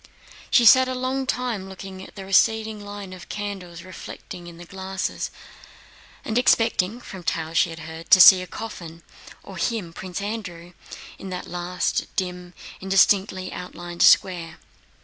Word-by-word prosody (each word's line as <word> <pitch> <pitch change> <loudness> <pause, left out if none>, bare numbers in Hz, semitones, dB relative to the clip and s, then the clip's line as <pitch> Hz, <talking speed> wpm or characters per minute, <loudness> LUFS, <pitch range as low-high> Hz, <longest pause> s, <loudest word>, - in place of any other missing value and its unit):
She 240 - +5
sat 260 +4 +8
a 255 - -3
long 260 +1 -2
time 235 -7 -2
looking 190 0 -9
at - - -12
the 195 -2 -8
receding 220 +2 +2
line 205 -2 -8
of 180 -1 -12
candles 190 -5 -6
reflected 180 -1 -10
in 170 -1 -11
the 175 - -11
glasses 190 +1 -4 1.0
and 220 +2 +1
expecting 225 -3 +2
(from 190 -6 -10
tales 165 -1 -1
she - - +3
had 165 -1 -8
heard) 160 +2 -9
to 185 - +8
see 185 0 +10
a 185 - -7
coffin, 170 -7 -8 0.4
or - - -10
him, 210 -8 -2
Prince 185 +1 -6
Andrew, 200 -5 -6 0.5
in 195 - -8
that 180 -1 -5
last 180 +1 -2
dim, 180 -2 -4 0.2
indistinctly 190 -1 +2
outlined 175 -1 -7
square. 170 -4 +4
190 Hz, 150 wpm, -23 LUFS, 175-205 Hz, 1.0 s, see